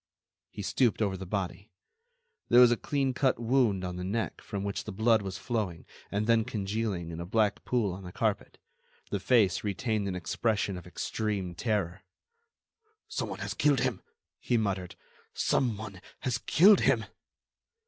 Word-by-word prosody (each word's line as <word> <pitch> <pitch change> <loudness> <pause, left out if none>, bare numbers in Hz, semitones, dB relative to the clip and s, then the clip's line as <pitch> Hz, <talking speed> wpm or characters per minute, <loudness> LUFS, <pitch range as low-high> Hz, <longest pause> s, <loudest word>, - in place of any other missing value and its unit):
He 105 - -7
stooped 120 +3 +2
over 100 -3 +1
the 95 0 -7
body. 100 +2 -3 0.8
There 120 - +7
was 125 -1 +8
a - - +4
clean 135 +2 -1
cut 130 0 +2
wound 115 -5 +2
on 90 0 -4
the 90 - -4
neck 105 +4 -2
from 100 -2 -5
which 100 0 -3
the 105 - -5
blood 110 +2 +3
was 95 -2 -5
flowing 100 -9 -3 0.2
and 105 +1 -1
then 115 0 +4
congealing 105 -5 -3
in 80 - -6
a 85 - -4
black 105 +1 +1
pool 115 -7 +1
on 95 - -8
the 90 - -8
carpet. - - -2 0.5
The 100 - 0
face 100 -4 +3
retained 105 0 -1
an 95 - -2
expression 100 +4 -1
of 90 - -9
extreme 100 -5 -3
terror. 95 -2 -1 1.1
"Some - - -3
one - - -6
has - - -3
killed 145 -4 +3
him!" - - -1 0.4
he 120 - +1
muttered, 95 -5 -2 0.4
"some 120 -6 +1
one 100 -3 -8 0.2
has 120 -3 -1
killed 195 - +6
him!" - - +2
105 Hz, 170 wpm, -29 LUFS, 95-115 Hz, 1.1 s, was